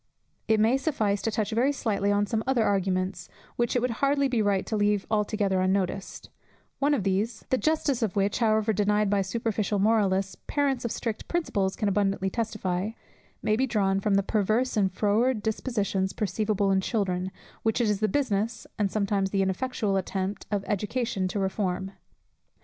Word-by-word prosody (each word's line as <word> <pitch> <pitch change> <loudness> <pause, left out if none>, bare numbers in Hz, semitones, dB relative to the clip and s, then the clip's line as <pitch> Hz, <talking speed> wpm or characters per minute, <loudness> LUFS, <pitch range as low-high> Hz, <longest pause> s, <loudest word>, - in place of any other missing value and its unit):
It 220 -1 +3
may 225 +5 +4
suffice 220 -9 0
to 225 - 0
touch 215 0 -1
very 245 +6 +2
slightly 205 -7 0
on 205 0 +2
some 220 +2 -1
other 260 -4 +3
arguments, 185 -2 0 0.3
which 240 0 0
it 245 - +2
would 250 - +1
hardly 280 0 +3
be 245 -4 +1
right 200 -2 +1
to 220 - -2
leave 205 -1 +1
altogether 205 -3 +1
unnoticed: 190 0 -1 0.5
one 290 +1 +3
of 240 - -2
these 205 +4 -1
(the 260 - +4
justice 300 -5 +1
of 220 -5 -1
which, 200 +2 +1
however 220 -1 +2
denied 210 0 +2
by 200 -1 +3
superficial 210 +1 -1
moralists, 195 -2 +2
parents 280 -3 0
of 235 - -2
strict 225 -2 -4
principles 200 - 0
can 210 - -1
abundantly 195 -1 +1
testify) 215 -3 -2 0.5
may 215 - +2
be 260 +4 +1
drawn 195 -4 +1
from 195 0 +1
the 200 - +3
perverse 215 +5 +1
and 195 -3 +2
froward 215 +4 +1
dispositions 205 -4 -1
perceivable 205 0 0
in 190 0 +3
children, 190 -3 -1 0.3
which 225 +1 +1
it 235 - +2
is 210 -2 +1
the 215 - +2
business 230 -2 -1
and 205 -2 +2
sometimes 200 -1 0
the 195 0 +1
ineffectual 200 +1 -1
attempt 190 +1 -3
of 205 -2 -1
education 210 -1 -1
to 185 - -4
reform. 190 -1 -1
210 Hz, 175 wpm, -27 LUFS, 195-230 Hz, 0.5 s, may